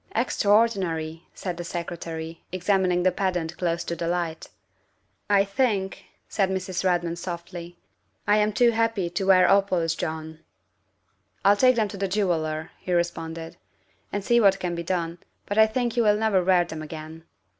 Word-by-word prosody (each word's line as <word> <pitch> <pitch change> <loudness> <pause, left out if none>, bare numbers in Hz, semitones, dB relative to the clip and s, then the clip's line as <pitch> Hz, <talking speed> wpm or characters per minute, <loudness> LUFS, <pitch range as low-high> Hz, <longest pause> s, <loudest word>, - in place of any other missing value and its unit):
" - - -23
Extraordinary!" 195 -8 +1
said 180 -3 -4
the 175 - -4
Secretary, 165 -1 -6
examining 185 -1 +1
the 185 - +4
pendant 175 -3 -2
close 170 -1 0
to 170 - -3
the 170 0 -3
light. 170 -2 -2 0.4
" - - -45
I - - +5
think," 200 -2 -1 0.2
said 195 -3 0
Mrs. 185 -1 -2
Redmond 175 -2 0
softly, 175 0 -7 0.5
"I 210 - +4
am 210 0 +2
too 240 +3 +4
happy 225 -6 0
to 190 +2 -2
wear 185 -1 +6
opals, 185 -5 +3
John." 160 -1 -5 0.5
" - - -37
I'll 200 +1 +7
take 255 +4 +5
them 220 -2 +2
to 200 -1 -5
a - - +2
jeweller," 165 -5 -1
he 180 - -3
responded, 165 -1 -2 0.3
" - - -39
and 205 0 -2
see 235 0 +4
what 195 -2 +5
can 180 -2 -2
be 170 - -3
done, 170 -1 -2 0.3
but 205 +2 -1
I 220 - +7
think 240 +1 -1
you 240 - +3
will 210 -2 +4
never 210 -4 +2
wear 180 -1 +4
them 160 -2 -7
again. 155 +1 -9
180 Hz, 175 wpm, -25 LUFS, 170-200 Hz, 0.5 s, I'll